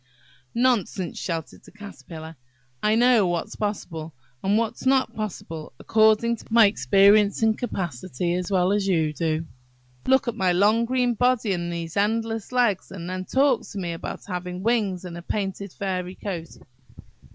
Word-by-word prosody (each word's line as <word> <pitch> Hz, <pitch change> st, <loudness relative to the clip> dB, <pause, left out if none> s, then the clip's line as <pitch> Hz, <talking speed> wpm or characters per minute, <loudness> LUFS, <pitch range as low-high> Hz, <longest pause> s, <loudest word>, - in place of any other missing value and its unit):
"Nonsense!" 230 Hz, -7 st, 0 dB
shouted 165 Hz, -4 st, -5 dB
the -, -, -15 dB
Caterpillar. 165 Hz, -6 st, -10 dB, 0.5 s
"I 215 Hz, +1 st, +3 dB
know 235 Hz, -4 st, +5 dB
what's 175 Hz, +5 st, -2 dB
possible, 165 Hz, -7 st, -4 dB, 0.3 s
and 200 Hz, +2 st, +3 dB
what's 230 Hz, +3 st, -2 dB
not 265 Hz, 0 st, +2 dB
possible, 165 Hz, -7 st, -6 dB
according 220 Hz, +2 st, +3 dB
to -, -, -14 dB
my 230 Hz, -1 st, +7 dB
experience 200 Hz, +1 st, +4 dB
and 220 Hz, -1 st, +4 dB
capacity, 175 Hz, -, -3 dB
as 180 Hz, 0 st, -2 dB
well 185 Hz, -1 st, +2 dB
as 205 Hz, -1 st, +1 dB
you 160 Hz, -5 st, +1 dB
do. 160 Hz, +1 st, -1 dB, 0.6 s
Look 265 Hz, 0 st, +4 dB
at 235 Hz, -, 0 dB
my 190 Hz, -5 st, +1 dB
long 210 Hz, +5 st, +3 dB
green 250 Hz, 0 st, +1 dB
body 240 Hz, -3 st, +2 dB
and 175 Hz, -1 st, -3 dB
these 170 Hz, -1 st, -5 dB
endless 225 Hz, +2 st, 0 dB
legs, 240 Hz, -6 st, +1 dB
and 175 Hz, -3 st, -7 dB
then 185 Hz, 0 st, -4 dB
talk 270 Hz, +1 st, +3 dB
to -, -, -7 dB
me 175 Hz, -3 st, -3 dB
about 165 Hz, -, -6 dB
having 180 Hz, -1 st, -5 dB
wings 205 Hz, -6 st, 0 dB
and 175 Hz, -2 st, -7 dB
a -, -, -9 dB
painted 195 Hz, +1 st, -3 dB
feathery 185 Hz, -1 st, -3 dB
coat! 170 Hz, -5 st, -6 dB
200 Hz, 160 wpm, -24 LUFS, 175-225 Hz, 0.6 s, my